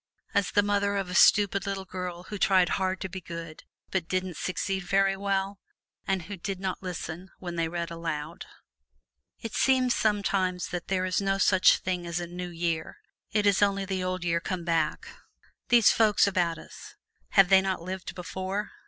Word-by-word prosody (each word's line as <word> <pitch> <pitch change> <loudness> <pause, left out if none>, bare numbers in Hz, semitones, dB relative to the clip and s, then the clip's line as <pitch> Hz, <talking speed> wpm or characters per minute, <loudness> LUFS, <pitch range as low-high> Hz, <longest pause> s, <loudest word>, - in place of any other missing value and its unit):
As 200 -2 +2
the 205 - +3
mother 200 0 +1
of 195 -2 -2
a - - -4
stupid 200 +1 +4
little 195 -1 -3
girl 180 -1 -6
who 205 +2 -7
tried 185 -3 +4
hard 190 -1 0
to - - -2
be 190 +1 -7
good, 165 -2 -8 0.3
but 185 -4 -1
didn't 185 -1 -2
succeed 190 +3 -2
very 195 +2 +2
well, 195 0 -2 0.5
and 190 -2 0
who 200 +4 -7
did 190 +1 -4
not 190 -1 -3
listen 180 0 -6
when 175 -2 -6
they 165 -1 0
read 170 0 -4
aloud. 165 -1 -5 0.9
It 225 - -6
seems 255 -2 +3
sometimes 195 -5 0
that 175 -1 -5
there 185 -1 0
is 185 +2 0
no 195 0 +1
such 185 -1 +5
thing 180 -2 -3
as 170 0 -2
a 175 - -3
New 180 +1 -6
Year 165 -2 -3 0.3
it 210 0 +1
is 200 -1 +3
only 200 -1 +2
the 190 -1 -2
old 185 0 -2
year 170 -1 +1
come 180 0 -4
back. 165 -3 0 0.6
These 240 -3 +6
folks 215 -2 +4
about 175 -4 0
us - - -12 0.4
have 195 -2 +6
they 190 -1 +7
not 190 -3 -2
lived 185 +1 -6
before? 190 +3 -4
185 Hz, 185 wpm, -28 LUFS, 175-195 Hz, 0.9 s, they